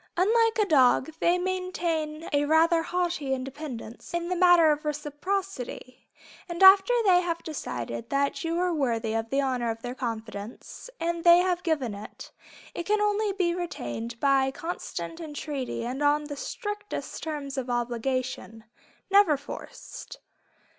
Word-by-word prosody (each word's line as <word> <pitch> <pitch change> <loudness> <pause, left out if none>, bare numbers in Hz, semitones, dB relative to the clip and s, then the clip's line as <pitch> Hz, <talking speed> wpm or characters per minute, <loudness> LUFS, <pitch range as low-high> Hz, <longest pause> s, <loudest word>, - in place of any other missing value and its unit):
Unlike 455 +5 +3
a 425 - +3
dog, 270 -3 +4
they 345 +1 +3
maintain 345 -4 -2
a 290 0 +3
rather 325 +2 +4
haughty 340 -6 -1
independence 260 -1 -7
in 345 0 -2
the 365 - 0
matter 350 -3 +6
of 300 +1 -1
reciprocity, 295 -2 -4 0.4
and 345 +2 -1
after 385 +4 +8
they 360 -2 +6
have 335 -1 -3
decided 120 - -5
that 280 +3 0
you 330 0 -1
are 360 0 +1
worthy 235 -7 0
of 225 0 -2
the 275 +3 +1
honor 250 -3 -1
of 225 0 -5
their 245 0 -4
confidence, 225 - -6
and 335 0 -2
they 345 0 +8
have 360 0 +1
given 295 -10 -1
it, 205 +1 -10 0.4
it 345 - -5
can 425 0 +2
only 420 0 +1
be 365 -3 0
retained 235 - -5
by 270 -1 +3
constant 330 +2 -6
entreaty 290 -6 -4
and 255 +4 -4
on 295 +1 +3
the 295 -1 -6
strictest 415 +7 -5
terms 295 -4 -4
of 260 -2 -4
obligation, 240 -1 -2 0.5
never 395 -7 +5
forced. 285 - -9
305 Hz, 145 wpm, -27 LUFS, 255-355 Hz, 0.5 s, after